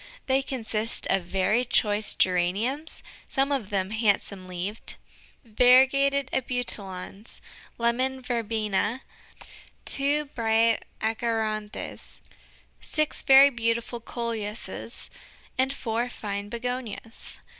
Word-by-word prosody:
They 265 0 +3
consist 230 -4 -2
of 190 -2 +1
very 195 +6 +2
choice 210 -3 +1
Geraniums 200 - 0 0.2
some 270 +1 +1
of 255 -8 -1
them 195 -1 -1
handsome 200 -3 +1
leaved 185 +4 -4 0.5
variegated 265 +4 +5
Abutilons, 210 -6 -3 0.4
Lemon 255 +3 +1
Verbena, 225 -1 -1 0.8
two 290 +2 +1
bright 230 -3 +2 0.2
Achyranthes, 220 -2 -2 0.6
six 305 -1 -1
very 275 +1 +8
beautiful 235 0 -1
Coleuses, 230 -2 -5 0.4
and 260 +1 +2
four 240 -2 -2
fine 205 -3 -5
Begonias. 235 -1 -5
230 Hz, 90 wpm, -27 LUFS, 210-260 Hz, 0.8 s, very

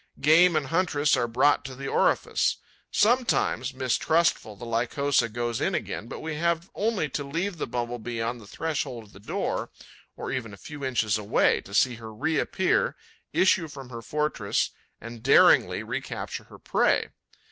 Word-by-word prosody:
Game 165 +3 +5
and 155 -2 +1
huntress 150 -1 +2
are 120 -2 0
brought 130 +5 +3
to 130 -1 -7
the 135 +1 -6
orifice. - - +1 0.3
Sometimes, 215 - +2
mistrustful, 130 -1 +1
the 120 - -9
Lycosa 120 +2 +1
goes 120 +1 -3
in - - +1
again; 110 - -4
but - - -7
we 160 -1 -4
have 170 +2 0
only 210 -7 0
to 145 - -3
leave 170 +6 -3
the - - -2
Bumble 120 0 -3
bee 115 +1 -5
on 115 +2 -2
the 105 - -14
threshold 140 -4 -3
of 105 - -19
the 95 - -13
door, 105 - -3 0.5
or - - -5
even 115 -6 -4
a - - -19
few 145 +7 -9
inches 110 -5 +1
away, 105 -1 +2
to 100 - -9
see 125 0 +3
her 110 -1 -9
reappear, 160 - 0 0.4
issue 185 -3 +3
from 135 -4 -10
her 115 -1 -6
fortress 150 -5 -1 0.3
and 115 0 -9
daringly 135 +4 +5
recapture - - -5
her - - -14
prey. - - +1
130 Hz, 170 wpm, -26 LUFS, 115-160 Hz, 0.5 s, Game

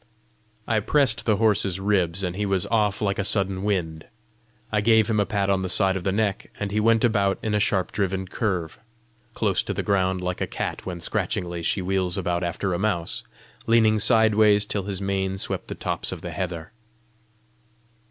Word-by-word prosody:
I 110 -1 +2
pressed 130 +1 +1
the 110 - +4
horse's 100 -4 +1
ribs, 95 -2 0
and 90 -1 -2
he 105 - -2
was 95 -2 0
off 105 -2 +1
like 100 -1 0
a - - +1
sudden 95 -1 0
wind. 85 -6 -2 0.6
I 105 -1 +1
gave 110 0 +4
him 110 -2 +1
a 100 - +1
pat 100 -2 0
on 95 -1 +1
the 95 - -3
side 95 0 +3
of 95 - -4
the 95 - 0
neck, 100 0 -1
and 100 -1 -3
he 105 - 0
went 115 +1 +3
about 100 -4 +2
in 110 - -1
a 105 - +2
sharp 95 -3 +1
driven 95 -2 -2
curve, 90 -6 -3 0.6
"close - - +1
to - - -4
the - - -2
ground, 95 -2 +1
like 90 0 -3
a - - 0
cat - - -5
when 90 -2 -5
scratchingly 85 +1 -2
she 90 +3 -1
wheels 95 -1 +1
about 90 -1 -1
after 90 +2 -2
a 85 - -2
mouse," 90 -5 -1 0.4
leaning 110 -1 +4
sideways 105 -1 +4
till 100 -2 -2
his 100 -1 -3
mane 95 -1 -1
swept - - -4
the - - -5
tops - - -3
of - - -6
the - - -6
heather. 85 -3 -5
100 Hz, 195 wpm, -24 LUFS, 95-105 Hz, 0.6 s, the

